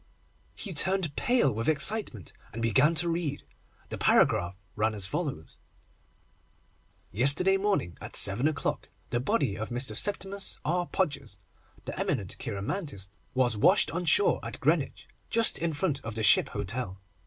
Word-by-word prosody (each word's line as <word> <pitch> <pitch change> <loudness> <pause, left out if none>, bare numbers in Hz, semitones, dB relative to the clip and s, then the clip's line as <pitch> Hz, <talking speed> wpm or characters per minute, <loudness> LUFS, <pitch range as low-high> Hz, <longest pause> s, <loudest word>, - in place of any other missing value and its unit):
He 200 - -6
turned 185 -1 +1
pale 240 - +2
with 115 +6 -1
excitement, 155 - +1 0.2
and 115 - -6
began 135 +8 +3
to 165 +3 +2
read. 165 -4 -2 0.5
The - - -6
paragraph 90 +2 +3 0.2
ran 110 +1 0
as 100 -2 -1
follows: 115 - -4 1.5
Yesterday 140 - +4
morning, 195 - -1
at - - -7
seven 105 +9 +3
o'clock, 155 -2 -3 0.2
the 120 - 0
body 130 - 0
of 110 +2 -5
Mr. 125 +3 -4
Septimus 200 -1 0
R. 175 +3 0
Podgers, 140 - -2 0.5
the - - -6
eminent 105 -10 -2
cheiromantist, 105 - -5 0.3
was 125 -3 +2
washed 105 - +3
on 175 +3 -3
shore 415 - +4
at - - -7
Greenwich, - - 0 0.2
just 230 -1 +3
in 170 0 -1
front 145 -2 -2
of 115 -1 -6
the 110 - -2
Ship - - +5
Hotel. 95 +1 -4
140 Hz, 145 wpm, -28 LUFS, 110-180 Hz, 1.5 s, Ship